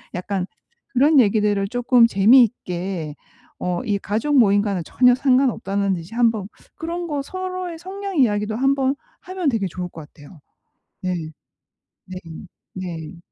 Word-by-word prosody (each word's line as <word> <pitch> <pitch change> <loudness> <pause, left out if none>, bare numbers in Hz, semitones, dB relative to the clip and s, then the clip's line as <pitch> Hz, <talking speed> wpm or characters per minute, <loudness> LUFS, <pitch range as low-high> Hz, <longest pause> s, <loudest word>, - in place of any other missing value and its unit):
약간 185 +1 -3 0.5
그런 285 +3 +5
얘기들을 205 -3 +2
쪼끔 245 0 +4
재미있게 195 - +2 0.4
어 180 -1 -2
이 205 -3 +1
가족 265 +9 0
모임과는 200 -4 +2
전혀 250 +6 +4
상관없다는 245 -7 +1
듯이 170 +4 -9
한번 225 -5 +2 0.3
그런 340 +2 -4
거 295 -3 -2
서로의 370 -1 -5
성향 390 +2 -6
이야기도 210 -3 +2
한번 270 +1 +2 0.3
하면 370 -5 -2
되게 220 -6 0
좋을 180 0 -6
것 160 -3 -11
같아요. 150 +3 -15 0.6
네. 185 -1 -1 0.9
네. 185 0 -7 0.6
네. 170 -3 -6
220 Hz, 270 characters per minute, -21 LUFS, 185-275 Hz, 0.9 s, 그런